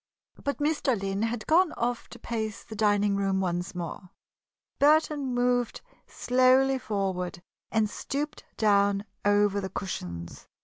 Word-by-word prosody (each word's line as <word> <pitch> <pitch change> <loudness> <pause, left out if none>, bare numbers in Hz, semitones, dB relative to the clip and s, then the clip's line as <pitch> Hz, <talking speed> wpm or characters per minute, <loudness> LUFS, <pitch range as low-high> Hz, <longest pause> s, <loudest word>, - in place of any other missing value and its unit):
But 280 -3 -1
Mr. 290 -6 +1
Lynn 195 +1 -2
had 225 0 -2
gone 335 +1 +4
off 240 0 -2
to - - -10
pace 220 -3 -4
the 220 - -9
dining 205 -1 +2
room 195 -1 +1
once 175 -1 -2
more. 180 +1 -6 0.7
Burton 295 -2 +3
moved 245 -1 +1 0.3
slowly 255 +1 +3
forward 185 -5 -3 0.3
and 220 -1 +2
stooped 285 +7 -4
down 200 -1 +3 0.2
over 205 0 +3
the 190 - -4
cushions. 85 - -6
215 Hz, 130 wpm, -28 LUFS, 195-255 Hz, 0.7 s, gone